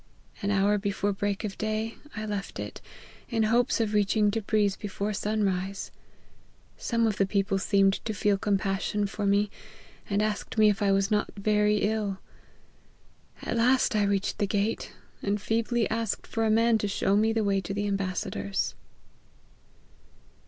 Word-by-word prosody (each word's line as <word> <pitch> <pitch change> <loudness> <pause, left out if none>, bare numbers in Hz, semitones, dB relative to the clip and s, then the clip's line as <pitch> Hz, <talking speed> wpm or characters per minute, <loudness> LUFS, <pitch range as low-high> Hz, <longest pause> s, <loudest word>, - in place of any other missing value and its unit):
An 200 - -1
hour 205 +1 +3
before 200 0 -1
break 200 +1 -2
of 205 -3 -5
day 215 +1 -1 0.2
I 215 0 -4
left 205 -1 -4
it, - - -6 0.5
in 225 -2 +1
hopes 235 +4 +2
of 220 -2 0
reaching 210 0 +3
Tebriz 210 -2 +1
before 205 +1 -3
sun 210 +1 -1
rise. 190 +1 -2 0.8
Some 230 -1 0
of 215 -2 0
the 195 - +3
people 195 -1 +1
seemed 195 0 +2
to 220 - -1
feel 200 0 +2
compassion 200 +1 0
for 200 +1 -2
me, 200 +1 +2 0.6
and 205 +1 +1
asked 215 +1 -3
me 215 -1 +6
if 205 -1 0
I 200 -1 +3
was 195 +1 +2
not 210 -1 +1
very 210 +1 +2
ill. 205 -2 0 1.3
At - - -2
last 250 +1 +3
I 210 - +3
reached 200 -1 0
the 205 - +1
gate, 205 +2 -1 0.3
and 205 +1 0
feebly 225 +2 0
asked 225 -2 -2
for 225 0 -1
a - - +2
man 225 +1 +4
to 205 - -1
show 195 0 +1
me 220 +2 +3
the 225 -1 +1
way 195 -1 +1
to 190 - -6
the 205 +1 -1
am 200 -1 0
oassador's." 100 - -2
205 Hz, 165 wpm, -28 LUFS, 200-215 Hz, 1.3 s, me